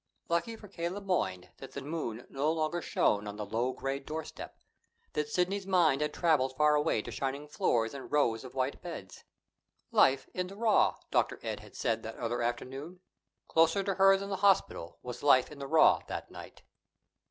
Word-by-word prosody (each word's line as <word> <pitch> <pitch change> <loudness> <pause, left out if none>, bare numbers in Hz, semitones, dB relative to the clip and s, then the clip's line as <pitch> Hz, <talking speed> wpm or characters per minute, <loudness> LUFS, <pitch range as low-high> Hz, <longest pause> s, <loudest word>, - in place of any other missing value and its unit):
Lucky 170 +7 0
for 215 -2 -12
K. 170 -3 -3
Le 190 +3 -5
Moyne 95 - -1
that 135 - -10
the 140 - -5
moon 135 -7 -4
no 140 +3 0
longer 160 +1 -1
shone 105 -8 +1
on 105 - -5
the 105 0 -5
low 115 +5 -1
gray 135 +1 -3
doorstep, 155 +3 -7 0.6
that 150 0 -1
Sidney's 190 +4 0
mind 170 -7 +3
had 150 - 0
traveled 145 -6 +2
far 150 0 +5
away 150 -7 +1
to - - -7
shining 140 +2 -3
floors 115 -6 0
and 140 -1 -8
rows 120 -7 +2
of 130 0 -11
white 130 +1 -1
beds. 165 - -8 0.7
"Life 135 0 +4
in 180 0 -2
the 195 - -10
raw," 220 0 +3 0.2
Dr. - - +1
Ed - - -3
had - - -15
said 115 -1 0
that 110 0 -7
other 120 0 -2
afternoon. 135 +9 -4 0.5
Closer 165 +4 +3
to 195 - 0
her 195 0 +6
than 200 +1 -6
the 195 - -1
hospital 190 - +2
was 125 -1 -7
life 135 -2 +5
in 150 - -10
the 140 - -5
raw 160 +2 +6
that - - -6
night. - - -11
150 Hz, 190 wpm, -31 LUFS, 125-175 Hz, 0.7 s, her